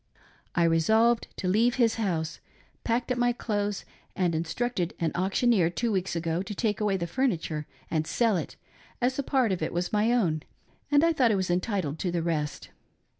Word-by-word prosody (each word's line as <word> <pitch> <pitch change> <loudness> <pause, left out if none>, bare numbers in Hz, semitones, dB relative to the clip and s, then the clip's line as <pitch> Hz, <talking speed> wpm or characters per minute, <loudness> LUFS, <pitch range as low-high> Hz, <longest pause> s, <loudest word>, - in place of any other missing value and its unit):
I 170 - +3
resolved 220 +9 +3
to 185 - -3
leave 225 +6 +3
his 235 -3 +3
house, 165 -6 -2 0.4
packed 240 +2 0
up 250 - 0
my 245 0 +3
clothes 205 -4 -2 0.3
and 180 -3 +1
instructed 175 +3 -2
an 165 -2 0
auction 195 +7 +2
eer 175 -6 +3
two 230 +6 -1
weeks 190 -3 -1
ago 165 +1 -1
to 200 +2 -6
take 215 0 -1
away 205 -2 +1
the 170 - -2
furniture 170 - -1 0.2
and 155 -1 0
sell 230 -4 +2
it, 170 - -4 0.4
as 255 +2 0
a - - +3
part 260 -5 +1
of 185 - -2
it 155 - -1
was 175 +3 -2
my 210 +2 +3
own, 175 -11 +1 0.5
and 290 +1 +4
I 335 0 +4
thought 255 -7 +3
I - - +3
was 190 -2 0
entitled 180 -5 -1
to 180 - -1
the 170 -1 -1
rest. 155 -3 -3
195 Hz, 195 wpm, -27 LUFS, 170-235 Hz, 0.5 s, and